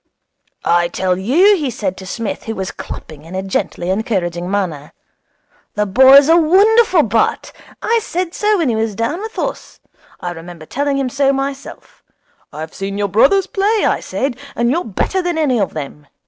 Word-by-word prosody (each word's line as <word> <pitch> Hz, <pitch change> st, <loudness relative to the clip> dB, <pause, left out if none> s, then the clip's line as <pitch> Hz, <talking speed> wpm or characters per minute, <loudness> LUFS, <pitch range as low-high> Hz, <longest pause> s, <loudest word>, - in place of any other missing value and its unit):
'I 175 Hz, 0 st, +3 dB
tell 180 Hz, +1 st, -1 dB
you,' 340 Hz, -, +4 dB
he 295 Hz, -5 st, -2 dB
said 195 Hz, -5 st, -3 dB
to 190 Hz, -, -9 dB
Psmith, 225 Hz, +3 st, -4 dB
who 225 Hz, -, -4 dB
was 190 Hz, -1 st, -4 dB
clapping 150 Hz, -2 st, -9 dB
in 165 Hz, +3 st, -9 dB
a 190 Hz, -, -2 dB
gently 185 Hz, -1 st, -2 dB
encouraging 180 Hz, -4 st, -2 dB
manner, 170 Hz, -8 st, -3 dB, 0.8 s
'the 210 Hz, 0 st, +1 dB
boy's 265 Hz, +7 st, +7 dB
a 325 Hz, -, +6 dB
wonderful 375 Hz, +2 st, +4 dB
bat. 225 Hz, 0 st, 0 dB, 0.3 s
I 460 Hz, 0 st, +2 dB
said 360 Hz, -3 st, -3 dB
so 420 Hz, 0 st, +1 dB
when 325 Hz, -7 st, +1 dB
he 230 Hz, -, 0 dB
was 220 Hz, -1 st, -1 dB
down 230 Hz, -, -2 dB
with 440 Hz, +1 st, -7 dB
us. -, -, -4 dB, 0.4 s
I 175 Hz, -, -4 dB
remember 170 Hz, -1 st, -10 dB
telling 280 Hz, -, -1 dB
him 270 Hz, -2 st, -1 dB
so 275 Hz, +1 st, +2 dB
myself. 275 Hz, 0 st, -6 dB, 0.5 s
"I've 155 Hz, +2 st, -7 dB
seen 195 Hz, +1 st, -5 dB
your 205 Hz, -1 st, -1 dB
brothers 280 Hz, -, +4 dB
play," 410 Hz, +2 st, 0 dB
I -, -, +1 dB
said, 270 Hz, -2 st, -3 dB, 0.2 s
"and 235 Hz, +1 st, +1 dB
you're 340 Hz, +5 st, 0 dB
better 235 Hz, -, -1 dB
than 350 Hz, -2 st, -2 dB
any 275 Hz, -7 st, +1 dB
of 195 Hz, -, -2 dB
them." 150 Hz, -1 st, -7 dB
230 Hz, 180 wpm, -17 LUFS, -, 0.8 s, boy's